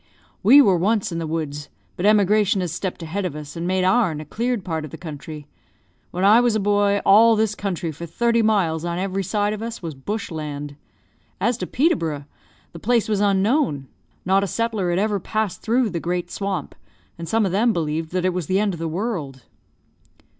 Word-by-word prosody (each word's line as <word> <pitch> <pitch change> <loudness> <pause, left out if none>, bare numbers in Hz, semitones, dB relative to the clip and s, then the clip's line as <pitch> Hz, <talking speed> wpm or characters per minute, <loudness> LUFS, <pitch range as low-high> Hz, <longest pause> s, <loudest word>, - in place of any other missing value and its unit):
"We 270 +8 +8
were 190 -6 +4
once 200 +3 +1
in 170 - -3
the 165 - -3
woods, 150 -2 -4 0.3
but 185 - 0
emigration 210 -1 +3
has 175 -3 -2
stepped 180 0 -4
ahead 180 +5 -3
of 175 -5 -3
us, 150 -1 -8
and 170 +1 -3
made 185 0 +1
our'n 185 -5 +2
a 155 - -7
cleared 235 - -2
part 160 -3 -2
of 155 - -7
the - - -9
country. 155 -2 -8 0.6
When 180 +2 -1
I 215 +4 +7
was 240 -2 +2
a - - +2
boy, 205 0 +2
all 225 +3 +7
this 215 -1 +1
country, 190 -5 -3
for 170 +3 -8
thirty 235 +6 +1
miles 185 -8 +1
on 170 0 -2
every 195 +1 -2
side 205 +2 0
of 215 - -6
us, 230 -3 -6
was 165 -2 -4
bush 200 +10 -5
land. 145 -2 -5 0.6
As 235 +4 +1
to - - -3
Peterborough, 165 - 0 0.5
the 170 - -10
place 235 +4 +1
was 210 -2 0
unknown; 200 - +1 0.4
not 195 +2 +3
a - - -1
settler 220 -3 -1
had 175 - 0
ever 205 0 +1
passed 210 0 -2
through 235 -1 +1
the 170 - -2
great 175 +1 -3
swamp, 195 -2 -3 0.5
and 165 - -6
some 225 -1 +2
of 190 - -1
them 225 +5 +3
believed 160 -3 -2
that 185 0 -1
it 185 - +1
was 180 -4 -3
the 190 +1 +2
end 205 -2 +1
of 170 - -7
the 165 - -2
world." 160 - -4
190 Hz, 210 wpm, -22 LUFS, 165-215 Hz, 0.6 s, We